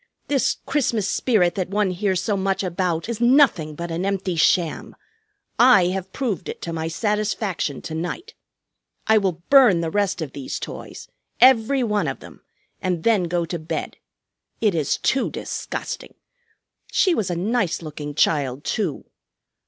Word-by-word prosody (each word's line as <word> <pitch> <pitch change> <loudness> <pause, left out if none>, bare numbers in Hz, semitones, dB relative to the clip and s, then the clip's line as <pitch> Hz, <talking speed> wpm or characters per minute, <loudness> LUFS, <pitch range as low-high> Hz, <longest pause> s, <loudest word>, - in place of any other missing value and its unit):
This 280 -3 +1
Christmas 235 -8 0
spirit 195 -9 +2
that 185 -2 -3
one 205 -1 +1
hears 185 0 -1
so 210 - 0
much 195 0 -1
about 175 -1 -1
is 235 -1 -4
nothing 240 - +4
but 170 +2 -5
an 165 +2 -2
empty 195 -2 -1
sham. 165 0 +1 0.6
I 210 -8 +6
have 190 0 -4
proved 210 -8 -3
it - - -6
to 170 - -4
my 160 0 -3
satisfaction 210 - -2
to 160 - -6
night. 175 - -5 0.7
I 220 -1 +5
will 180 -4 -2
burn 245 -11 +7
the 165 -1 -2
rest 200 -1 0
of 155 -5 -4
these 135 -2 -5
toys, - - -8 0.3
every 255 +1 +5
one 210 -3 0
of - - -4
them, - - -14 0.4
and 180 -4 -1
then 215 -6 +3
go 170 0 -1
to 170 +1 -4
bed. 155 +2 -5 0.6
It 210 -4 +2
is 155 -4 0
too 265 - +1
disgusting! - - -6 0.8
She 370 - +3
was 215 - -1
a 175 - -1
nice 195 -1 -1
looking 150 -1 -7
child, 140 -3 +1
too. 190 -10 -2
190 Hz, 160 wpm, -22 LUFS, 170-220 Hz, 0.8 s, burn